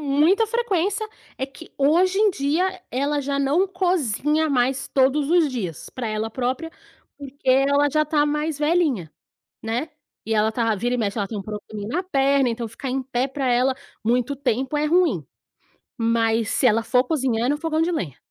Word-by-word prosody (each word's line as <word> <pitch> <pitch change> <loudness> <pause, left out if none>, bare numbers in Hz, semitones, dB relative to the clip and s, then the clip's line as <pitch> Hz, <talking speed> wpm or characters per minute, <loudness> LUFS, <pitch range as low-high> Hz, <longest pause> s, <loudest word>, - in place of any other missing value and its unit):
muita 305 +10 +3
frequência. 430 -2 0 0.3
É 265 - -2
que, 280 +4 -14
hoje 350 +7 +3
em 425 -1 +4
dia, 360 +5 -1
ela 285 +3 0
já 280 0 -2
não 290 +8 +2
cozinha 315 - 0
mais 265 0 0
todos 275 +3 +2
os 340 -4 +4
dias, 190 - -5
para 250 -3 -5
ela 215 +1 -2
própria, 260 +7 -2 0.5
porque 280 -1 -10
ela 280 +2 +4
já 305 +1 +2
está 300 -1 +1
mais 300 0 -1
velhinha, 295 - +1 0.5
né. 235 +8 -2 0.4
E 220 0 0
ela 215 +1 +2
tá 230 -1 +1
vira 240 +5 -1
e - - 0
mexe 205 0 -1
ela 200 - -1
tem 215 - -5
um - - -4
probleminha 210 0 -7
na 360 +6 -1
perna, 275 -6 +2
então, 230 0 -3
ficar 240 +4 -7
em 265 +1 -1
pé 255 0 -1
para 270 -1 -3
ela 255 +2 +3 0.3
muito 245 +4 +1
tempo 265 +2 -1
é 300 - +1
ruim. 350 +3 +2 0.7
Mas, 230 -2 +1
se 260 - +2
ela 225 -1 +3
for 250 +2 +3
cozinhar, 255 -6 0
é - - 0
no 290 - +2
fogão 315 0 -1
de 335 - +1
lenha. 180 - -3
275 Hz, 185 wpm, -23 LUFS, 235-310 Hz, 0.7 s, em